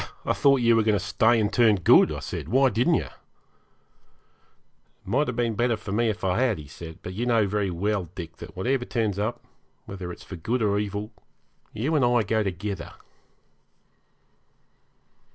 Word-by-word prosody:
'I - - +1
thought 140 -2 +3
you 115 -1 +4
were 115 - +4
going 105 -1 +2
to 95 - -5
stay 110 +4 +3
and 105 -1 0
turn 115 -4 +5
good,' 90 - +5
I - - -5
said. - - -6
'Why 130 +2 +4
didn't 125 +11 +2
you?' - - 0
'It - - -11 1.9
might 145 +5 +1
have 125 - -3
been 120 -1 0
better 120 +1 +1
for 100 - -8
me 115 +3 +1
if 105 - -4
I 95 +2 +1
had,' 125 -5 +2
he 75 - -9
said, 80 +2 -10
'but 90 - -6
you 120 +6 -3
know 115 -3 +3
very 100 0 -1
well, 100 +2 -1
Dick, 85 -2 -8
that - - -11
whatever 120 +6 0
turns 110 -5 -2
up, 110 +3 -3 0.4
whether 95 -3 -7
it's - - -11
for 95 - -9
good 115 +8 -1
or 100 -1 +2
evil, 105 +1 -4 0.6
you 135 +9 -2
and 145 - +3
I 120 -1 +3
go 110 +2 0
together.' 95 -2 -4
105 Hz, 190 wpm, -25 LUFS, 95-120 Hz, 1.9 s, turn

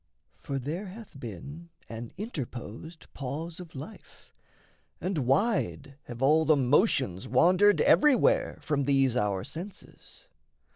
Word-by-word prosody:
For 140 - -4
there 155 +10 -4
hath 195 -6 -11
been 140 - -8 0.2
An 115 0 -7
interposed 160 - -7
pause 155 +6 -5
of 175 -4 -11
life, 155 +6 -11 0.7
and 165 -8 -2
wide 145 - 0
Have 120 +1 -6
all 155 +4 +5
the 155 -1 +4
motions 130 - +2
wandered 180 - +4
everywhere 295 -5 +4
From 140 -3 -1
these 135 -3 +2
our 100 -5 0
senses. 195 - -10
145 Hz, 115 wpm, -28 LUFS, 130-180 Hz, 0.7 s, all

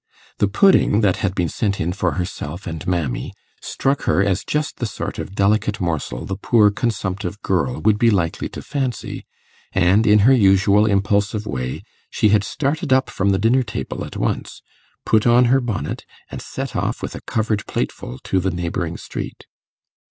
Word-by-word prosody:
The 105 - +3
pudding 110 - +4
that 95 -4 +2
had 95 0 -1
been 90 -2 +1
sent 100 +3 -1
in 85 +3 -1
for 100 - -1
herself 90 -1 -5
and 80 -3 -6
'Mammy,' 85 -9 -2 0.3
struck 135 +1 -1
her 95 - +3
as 95 -1 0
just 150 0 -2
the 120 - -2
sort - - -5
of 95 - -6
delicate 105 +1 +1
morsel 80 -8 -3
the 95 - -4
poor 105 0 +4
consumptive 100 -4 -3
girl 95 +7 0
would 105 -1 +3
be 115 - +5
likely 90 -6 0
to - - -8
fancy, 135 -6 -4 0.5
and 95 +4 +3
in 105 0 +6
her 135 - +7
usual 100 -1 +4
impulsive 100 +1 +1
way 65 -7 -4 0.3
she 105 - +2
had 105 -1 +3
started 140 +5 -2
up 130 0 +3
from 100 +1 0
the 95 - +3
dinner 115 +6 +3
table 110 - -5
at - - -7
once, - - -3 0.4
put 110 +1 +3
on 120 +1 +6
her 135 - +4
bonnet, 120 -5 -4 0.2
and - - -6
set - - -6
off - - -2
with - - -4
a - - -8
covered 110 -2 -1
plateful 60 - -4
to 95 - 0
the 95 +1 0
neighbouring 85 -1 -3
street. - - -7
100 Hz, 180 wpm, -20 LUFS, 90-115 Hz, 0.5 s, her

